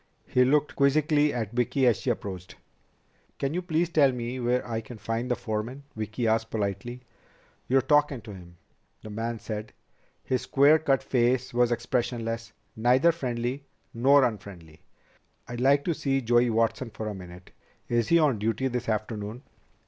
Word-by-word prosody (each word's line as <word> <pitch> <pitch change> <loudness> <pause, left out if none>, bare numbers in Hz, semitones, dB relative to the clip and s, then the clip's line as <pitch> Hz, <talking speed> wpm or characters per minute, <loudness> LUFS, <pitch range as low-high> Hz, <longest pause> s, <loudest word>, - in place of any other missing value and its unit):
He 125 - +3
looked 145 +3 +2
quizzically 150 +1 +3
at 110 -4 -3
Vicki 125 +2 +1
as 120 -3 +4
she - - -2
approached. 95 -5 -4 0.8
"Can 140 +1 -2
you 180 - -1
please 170 -1 0
tell 150 -5 +4
me 125 +1 -4
where 125 +1 0
I 115 -1 -2
can 115 +1 -11
find 115 +3 -3
the 125 - +2
foreman?" 115 +5 -4
Vicki 110 +2 -3
asked 115 0 +1
politely. 105 +4 -3 0.7
"You're 130 0 +3
talkin' 145 -2 +2
to 105 -1 -10
him," 85 -2 -13 0.5
the 110 - -8
man 115 +2 -3
said. 110 0 -6 0.5
His 130 -1 -1
square 145 +3 +4
cut 135 -4 +1
face 125 0 +1
was 120 0 +3
expressionless, 115 -1 -2 0.2
neither 125 +8 +4
friendly 130 -2 -4 0.3
nor 135 +4 +5
unfriendly. 100 -9 -5 0.7
"I'd 120 0 -5
like 140 +2 +3
to 170 - +1
see 135 -3 0
Joey 120 0 +3
Watson 115 +2 0
for 110 0 -6
a 105 - -3
minute. 90 -1 -11 0.4
Is 120 -1 +1
he 170 - +5
on 145 -9 +2
duty 115 +5 0
this 125 -2 -3
afternoon?" 110 +2 -3
120 Hz, 165 wpm, -27 LUFS, 110-135 Hz, 0.8 s, nor